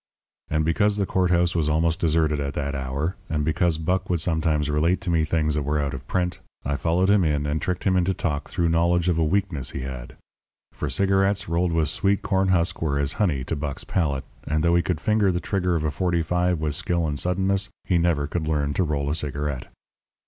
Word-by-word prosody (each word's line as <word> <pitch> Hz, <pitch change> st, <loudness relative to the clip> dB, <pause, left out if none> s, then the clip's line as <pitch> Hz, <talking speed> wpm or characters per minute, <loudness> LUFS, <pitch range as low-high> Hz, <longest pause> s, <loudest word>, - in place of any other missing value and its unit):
And 75 Hz, 0 st, +1 dB
because 105 Hz, +5 st, +2 dB
the 100 Hz, -, +1 dB
court 90 Hz, -1 st, +1 dB
house 85 Hz, -1 st, +2 dB
was 80 Hz, -3 st, +1 dB
almost 80 Hz, +1 st, +1 dB
deserted 80 Hz, -2 st, +2 dB
at 70 Hz, -1 st, -3 dB
that 70 Hz, -1 st, -2 dB
hour, 70 Hz, +6 st, -3 dB
and 75 Hz, -2 st, -1 dB
because 85 Hz, +1 st, +1 dB
Buck 90 Hz, +4 st, -1 dB
would 90 Hz, -2 st, +1 dB
sometimes 80 Hz, -3 st, 0 dB
relate 80 Hz, +5 st, +1 dB
to 90 Hz, -2 st, -2 dB
me 80 Hz, -2 st, +2 dB
things 75 Hz, -1 st, +1 dB
that 75 Hz, -, 0 dB
were 75 Hz, +2 st, -1 dB
out 70 Hz, -1 st, -1 dB
of 65 Hz, 0 st, -8 dB
print, 90 Hz, -1 st, -1 dB, 0.3 s
I 70 Hz, -, 0 dB
followed 85 Hz, +5 st, +1 dB
him 100 Hz, -1 st, +4 dB
in 75 Hz, -2 st, 0 dB
and 75 Hz, +2 st, -1 dB
tricked 90 Hz, -, -2 dB
him 95 Hz, -1 st, +2 dB
into 90 Hz, +1 st, +2 dB
talk 75 Hz, -5 st, -3 dB
through 85 Hz, -1 st, 0 dB
knowledge 85 Hz, +1 st, +2 dB
of 85 Hz, -2 st, +1 dB
a -, -, +3 dB
weakness 80 Hz, -5 st, 0 dB
he 70 Hz, -, -5 dB
had. 65 Hz, -2 st, -7 dB, 0.6 s
For, -, -, -4 dB
cigarettes 95 Hz, +1 st, +1 dB
rolled 85 Hz, +1 st, +1 dB
with 80 Hz, -2 st, +1 dB
sweet 100 Hz, +4 st, +1 dB
corn 95 Hz, 0 st, +1 dB
husk 90 Hz, -2 st, +1 dB
were 75 Hz, -3 st, 0 dB
as 70 Hz, 0 st, 0 dB
honey 75 Hz, -10 st, +1 dB
to 80 Hz, -, -3 dB
Buck's 70 Hz, -2 st, -4 dB
palate; 70 Hz, -7 st, -1 dB, 0.2 s
and 75 Hz, +1 st, 0 dB
though 85 Hz, 0 st, +3 dB
he 85 Hz, -, +4 dB
could 90 Hz, -3 st, -2 dB
finger 105 Hz, +2 st, +2 dB
the 90 Hz, -, -1 dB
trigger 90 Hz, -2 st, 0 dB
of 80 Hz, -, -1 dB
a 75 Hz, -, 0 dB
forty 85 Hz, +2 st, 0 dB
five 90 Hz, 0 st, +1 dB
with 75 Hz, -1 st, -1 dB
skill 85 Hz, +2 st, 0 dB
and 75 Hz, -2 st, -2 dB
suddenness, 95 Hz, +2 st, 0 dB
he 90 Hz, -3 st, +1 dB
never 85 Hz, -4 st, +1 dB
could 80 Hz, +1 st, -3 dB
learn 75 Hz, -2 st, 0 dB
to 95 Hz, -, +1 dB
roll 75 Hz, -3 st, -1 dB
a 75 Hz, -, 0 dB
cigarette. 75 Hz, -3 st, -3 dB
80 Hz, 230 wpm, -24 LUFS, 75-90 Hz, 0.6 s, him